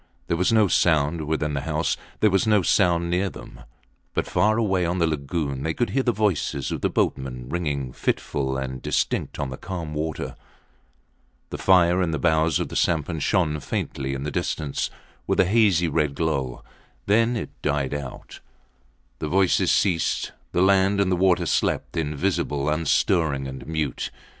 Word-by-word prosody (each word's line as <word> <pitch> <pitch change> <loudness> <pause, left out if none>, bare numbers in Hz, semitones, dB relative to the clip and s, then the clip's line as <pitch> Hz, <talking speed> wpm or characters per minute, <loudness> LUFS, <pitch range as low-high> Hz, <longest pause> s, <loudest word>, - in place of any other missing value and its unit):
There 85 - 0
was 90 +5 +2
no 110 -2 +5
sound 80 -2 +2
within 75 -1 -1
the 70 - -1
house, 75 +2 -1 0.3
there 105 - +5
was 95 +3 +2
no 105 -3 +4
sound 85 -2 +2
near 95 +2 +1
them; - - -12 0.6
but - - 0
far 110 +1 +2
away 95 -5 +1
on 85 +2 0
the 85 - +3
lagoon 70 -2 -2
they 80 +2 -2
could 120 - 0
hear 135 - +2
the 125 - +2
voices 95 - -1
of - - -3
the - - +1
boatmen 65 -2 -2
ringing 70 -6 -2
fitful 65 0 -1
and 65 -1 -4
distinct - - -1
on 70 -2 -3
the 65 - -6
calm 85 -4 -5
water. 75 0 -3 1.2
The - - -5
fire 90 -1 +4
in 90 - +1
the 80 - -1
bows 80 -2 +2
of - - -3
the - - -7
sampan 80 0 0
shone 75 -1 +1
faintly 65 -1 -3
in 65 - -5
the 75 - -3
distance 70 0 -2 0.4
with - - +1
a 95 - +6
hazy 95 -4 +3
red 75 -2 0
glow. 70 -6 -2 0.4
Then 115 +4 +3
it 110 - -5
died 70 -2 -1
out. 70 -3 -7 0.8
The 75 - -3
voices 95 +2 +3
ceased. 85 -5 +1 0.2
The 90 - +2
land 100 +1 +4
and 95 -2 +2
the - - +3
water 90 -1 +3
slept - - 0
invisible, 75 -2 -1
unstirring 75 -2 +1
and 65 +1 -8
mute. 80 -5 -2
80 Hz, 170 wpm, -24 LUFS, 70-95 Hz, 1.2 s, a